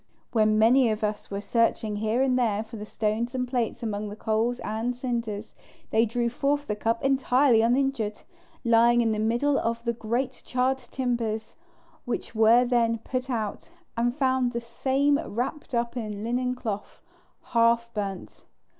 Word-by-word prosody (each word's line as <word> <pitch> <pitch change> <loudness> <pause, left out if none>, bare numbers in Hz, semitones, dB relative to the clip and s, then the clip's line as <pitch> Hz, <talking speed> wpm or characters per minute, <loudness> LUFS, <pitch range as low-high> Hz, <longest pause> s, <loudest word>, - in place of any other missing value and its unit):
When 215 -2 +3
many 235 +3 +5
of 215 0 -2
us 210 0 -2
were 200 0 -4
searching 220 0 +1
here 220 +4 +1
and 260 -2 +2
there 220 -4 +1
for 225 +1 -11
the 210 -1 -6
stones 225 +4 -1
and 250 -1 -1
plates 240 -2 -2
among 210 -1 -3
the 205 - -7
coals 220 +3 0
and 225 +3 -2
cinders, 230 -4 -4 0.4
they 225 +1 +3
drew 235 +2 0
forth 285 +4 0
the 210 - -2
cup 225 +2 -1
entirely 265 -2 +4
uninjured, 240 -3 0 0.4
lying 235 +1 +5
in 225 -1 +2
the 215 - -1
middle 240 +6 +2
of 230 0 -2
the 235 - +1
great 240 +3 -2
charred 260 +1 0
timbers, 240 -3 -3 0.5
which 245 - -4
were 225 +2 +5
then 235 -2 +2
put 255 +3 -4
out, 220 +2 -3 0.3
and 240 +1 0
found 260 -3 +1
the 235 - -1
same 270 +5 +1
wrapped 260 +3 -4
up 235 +1 -1
in 240 - -2
a 205 +1 -7
linen 250 +2 -1
cloth, 215 -5 -5 0.5
half 235 0 +4
burnt. 195 -3 -5
235 Hz, 165 wpm, -26 LUFS, 220-250 Hz, 0.5 s, many